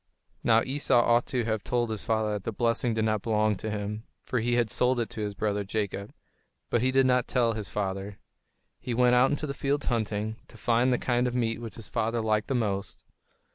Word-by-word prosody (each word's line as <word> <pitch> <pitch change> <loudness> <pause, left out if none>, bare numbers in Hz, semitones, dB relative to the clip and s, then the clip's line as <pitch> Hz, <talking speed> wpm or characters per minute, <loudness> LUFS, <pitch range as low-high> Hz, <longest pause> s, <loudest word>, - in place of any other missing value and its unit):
Now 115 0 +4
Esau 135 -2 +2
ought 120 0 +3
to 125 -2 0
have 110 -2 -1
told 120 -2 0
his 110 - -4
father 110 -2 0
that 105 -2 -4
the 115 - -2
blessing 115 +1 0
did 110 0 +1
not 110 -2 +1
belong 110 -1 +1
to 110 - -4
him, 105 0 -3 0.2
for 125 - -1
he 120 +2 +1
had 120 -3 +1
sold 125 0 +2
it 115 - -2
to 110 - -5
his 105 -1 -3
brother 105 0 -1
Jacob. 100 0 -3 0.6
But 120 - +2
he 130 - +2
did 135 0 +4
not 125 -1 +2
tell 120 -3 +2
his 110 -3 -5
father. 100 0 -3 0.6
He 120 - -3
went 125 0 +4
out 125 +2 +5
into 145 +1 -1
the 140 - -3
fields 140 +1 -1
hunting, 110 -2 -1
to 115 - -14
find 120 +2 +2
the 125 - +3
kind 125 0 +1
of 125 - -3
meat 115 -2 0
which 115 -4 -7
his 115 - -8
father 115 0 -1
liked 110 -1 0
the 135 - -1
most. 100 -5 -2
115 Hz, 225 wpm, -28 LUFS, 105-125 Hz, 0.6 s, out